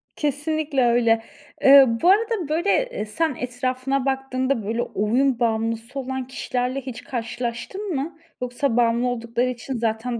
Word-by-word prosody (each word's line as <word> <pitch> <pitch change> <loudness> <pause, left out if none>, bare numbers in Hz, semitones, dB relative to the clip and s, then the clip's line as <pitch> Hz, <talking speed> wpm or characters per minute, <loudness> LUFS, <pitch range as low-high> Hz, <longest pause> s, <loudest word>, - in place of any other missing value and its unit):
Kesinlikle 295 -1 0
öyle. 230 -1 +3 0.4
Eee, 275 0 +9 0.2
bu 350 - +5
arada, 420 -4 +2
böyle, 335 +6 0 0.2
eee, - - -4
sen 305 +7 -1
etrafına 255 +2 -2
baktığında, 265 -2 -1
böyle, 230 +3 -1
oyun 240 +5 +1
bağımlısı 230 +2 -1
olan 260 -1 -4
kişilerle 255 0 -2
hiç 250 -2 -8
karşılaştın 240 - -4
mı? 290 +5 -3 0.2
Yoksa 250 0 -1
bağımlı 235 +1 +3
oldukları 235 0 -1
için 250 +2 -5
zaten 230 +1 -2
255 Hz, 135 wpm, -23 LUFS, 235-275 Hz, 0.4 s, Eee